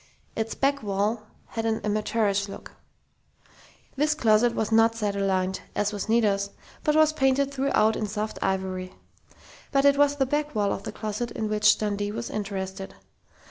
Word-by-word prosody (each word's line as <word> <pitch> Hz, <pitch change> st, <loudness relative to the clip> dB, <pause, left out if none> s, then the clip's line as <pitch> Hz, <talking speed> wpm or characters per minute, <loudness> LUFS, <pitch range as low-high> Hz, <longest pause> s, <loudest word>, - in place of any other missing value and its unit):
Its 225 Hz, 0 st, -2 dB
back 280 Hz, +1 st, +1 dB
wall 210 Hz, +2 st, -1 dB, 0.2 s
had 225 Hz, -, -3 dB
an 225 Hz, -1 st, 0 dB
amateurish 210 Hz, -1 st, 0 dB
look. -, -, -9 dB, 1.2 s
This 300 Hz, +2 st, +1 dB
closet 230 Hz, -3 st, +3 dB
was 220 Hz, 0 st, -1 dB
not 225 Hz, +1 st, +4 dB
cedar 205 Hz, -3 st, -1 dB
lined, 190 Hz, -1 st, 0 dB
as 210 Hz, 0 st, 0 dB
was 205 Hz, +1 st, -4 dB
Nita's, 205 Hz, -3 st, +2 dB, 0.3 s
but 300 Hz, -, +2 dB
was 310 Hz, 0 st, +5 dB
painted 275 Hz, -1 st, +1 dB
throughout 260 Hz, -5 st, +2 dB
in 215 Hz, -, -2 dB
soft 215 Hz, +1 st, -4 dB
ivory. 185 Hz, -1 st, -2 dB, 0.8 s
But 275 Hz, 0 st, +3 dB
it 280 Hz, 0 st, +5 dB
was 290 Hz, 0 st, +4 dB
the 275 Hz, -2 st, +1 dB
back 295 Hz, +1 st, -2 dB
wall 205 Hz, -2 st, +1 dB
of -, -, -5 dB
the -, -, -6 dB
closet 215 Hz, +2 st, -4 dB
in 220 Hz, -, -3 dB
which 210 Hz, 0 st, +4 dB
Dundee 205 Hz, -1 st, -2 dB
was 230 Hz, +2 st, -5 dB
interested. 195 Hz, -2 st, -5 dB
215 Hz, 165 wpm, -26 LUFS, 200-255 Hz, 1.2 s, was